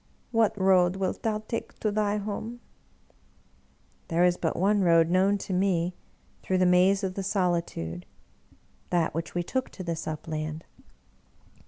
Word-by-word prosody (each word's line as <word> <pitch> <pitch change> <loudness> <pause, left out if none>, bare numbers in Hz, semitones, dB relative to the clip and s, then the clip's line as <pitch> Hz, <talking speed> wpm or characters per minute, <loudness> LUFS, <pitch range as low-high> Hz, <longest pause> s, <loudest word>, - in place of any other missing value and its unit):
What 225 -3 +2
road 185 -1 +4
wilt 190 -1 -2
thou 215 -1 -1
take 230 - -5
to 215 - +1
thy 210 0 0
home? 215 +3 -5 0.5
" - - -36 0.2
" - - -37
There 170 +1 +2
is 180 -1 +4
but 165 -2 -2
one 200 +3 +3
road 165 -2 +4
known 190 +3 +3
to 195 - -5
me 180 -2 +1 0.5
through 185 - 0
the 185 - +3
maze 185 +3 +4
of 190 -1 -1
the 195 - -4
solitude 170 - -2 0.4
— - - -28 0.3
that 170 -2 +1
which 165 +2 -4
we 175 - 0
took 260 +8 -2
to 185 - -8
this 165 -2 -4
upland." 155 0 -4
185 Hz, 165 wpm, -27 LUFS, 170-200 Hz, 0.5 s, road